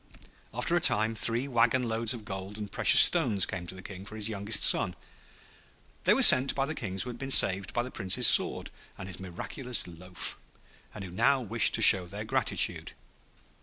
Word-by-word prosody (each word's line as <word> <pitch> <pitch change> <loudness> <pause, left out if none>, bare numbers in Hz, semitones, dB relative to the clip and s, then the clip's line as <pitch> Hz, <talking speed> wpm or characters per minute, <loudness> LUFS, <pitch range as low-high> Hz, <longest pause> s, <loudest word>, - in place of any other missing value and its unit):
After - - -3
a - - -1
time 110 +2 +1
three 115 +4 0
wagon 125 0 -1
loads 115 0 -3
of 110 -3 -13
gold 95 0 -9
and 105 -2 -10
precious - - +6
stones 100 -3 +3
came 90 -2 -9
to 95 - -10
the 95 - -14
King 95 0 -12
for 110 +2 -13
his 110 0 -4
youngest 105 +1 -2
son. - - +1 1.1
They - - +2
were - - +2
sent 130 +1 +7
by 135 - -3
the 155 - -7
Kings 95 -9 -4
who 125 - -9
had 120 - -14
been 135 - -8
saved 95 -7 0
by 120 - -4
the 130 - -11
Prince's 95 -4 -1
sword - - +3 0.3
and 95 - -11
his 95 -2 -9
miraculous 110 +7 -6
loaf, 90 +1 -11 0.6
and 105 - -10
who 90 - -11
now 135 +9 -1
wished 115 0 -2
to 110 - +1
show 95 -3 +6
their 105 +4 -9
gratitude. - - -2
105 Hz, 200 wpm, -26 LUFS, 95-120 Hz, 1.1 s, sent